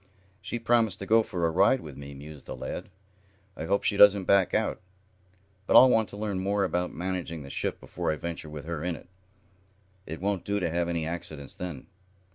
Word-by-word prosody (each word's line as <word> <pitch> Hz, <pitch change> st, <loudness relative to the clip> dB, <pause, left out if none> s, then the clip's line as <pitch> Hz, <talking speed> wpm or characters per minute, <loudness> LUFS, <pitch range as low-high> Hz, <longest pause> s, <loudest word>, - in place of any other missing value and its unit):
"She -, -, -4 dB
promised 115 Hz, -3 st, +2 dB
to 100 Hz, -, -6 dB
go 115 Hz, +3 st, +5 dB
for 90 Hz, -5 st, -2 dB
a 80 Hz, -, +2 dB
ride 100 Hz, +10 st, +4 dB
with 75 Hz, -, -9 dB
me," 70 Hz, 0 st, -9 dB
mused 75 Hz, +1 st, -11 dB
the -, -, -5 dB
lad. -, -, -6 dB, 0.7 s
"I 80 Hz, -, -5 dB
hope 100 Hz, +3 st, +1 dB
she 100 Hz, -, +1 dB
doesn't 100 Hz, -1 st, +7 dB
back 95 Hz, 0 st, +4 dB
out. -, -, 0 dB, 0.9 s
But -, -, +3 dB
I'll 130 Hz, 0 st, +9 dB
want 110 Hz, -3 st, +2 dB
to 100 Hz, -, -9 dB
learn 105 Hz, -3 st, -2 dB
more 100 Hz, +1 st, +1 dB
about 90 Hz, -1 st, -1 dB
managing 90 Hz, -3 st, -4 dB
the 70 Hz, -, -9 dB
ship -, -, -2 dB
before -, -, -3 dB
I -, -, -1 dB
venture 80 Hz, 0 st, -6 dB
with 75 Hz, -1 st, -8 dB
her 80 Hz, -2 st, -4 dB
in 90 Hz, -1 st, -1 dB
it. -, -, -14 dB, 1.0 s
It 80 Hz, +2 st, -6 dB
won't 100 Hz, -1 st, -1 dB
do 100 Hz, 0 st, -1 dB
to 85 Hz, -4 st, -1 dB
have 85 Hz, +1 st, 0 dB
any 85 Hz, -2 st, -1 dB
accidents 80 Hz, -3 st, -6 dB
then. 90 Hz, -8 st, -6 dB
90 Hz, 210 wpm, -28 LUFS, 80-100 Hz, 1.0 s, I'll